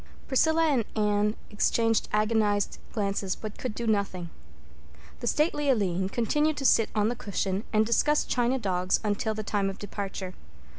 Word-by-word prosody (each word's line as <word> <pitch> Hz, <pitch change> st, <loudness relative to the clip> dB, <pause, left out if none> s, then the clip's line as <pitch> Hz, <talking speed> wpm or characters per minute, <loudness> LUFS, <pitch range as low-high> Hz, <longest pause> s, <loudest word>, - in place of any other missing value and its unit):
Priscilla 320 Hz, +5 st, +3 dB
and 275 Hz, -7 st, +2 dB
Anne 210 Hz, 0 st, +1 dB, 0.2 s
exchanged 225 Hz, +1 st, +1 dB
agonized 210 Hz, -1 st, +1 dB
glances 200 Hz, -2 st, -1 dB
but 215 Hz, -1 st, -8 dB
could 245 Hz, -4 st, -4 dB
do 235 Hz, -, -4 dB
nothing. 200 Hz, -5 st, -1 dB, 0.9 s
The -, -, -4 dB
stately 295 Hz, -2 st, +1 dB
Aline 190 Hz, -6 st, +1 dB
continued 295 Hz, +8 st, +1 dB
to 275 Hz, -, -3 dB
sit 225 Hz, -3 st, +4 dB
on 210 Hz, 0 st, +2 dB
the 245 Hz, -, -2 dB
cushion 200 Hz, -2 st, -2 dB
and 215 Hz, 0 st, +3 dB
discuss 295 Hz, +6 st, +2 dB
china 245 Hz, +1 st, +1 dB
dogs 185 Hz, -5 st, 0 dB
until 215 Hz, +1 st, -1 dB
the 215 Hz, -, -4 dB
time 200 Hz, -1 st, 0 dB
of 195 Hz, -, -6 dB
departure. 195 Hz, -2 st, -5 dB
215 Hz, 155 wpm, -27 LUFS, 200-240 Hz, 0.9 s, sit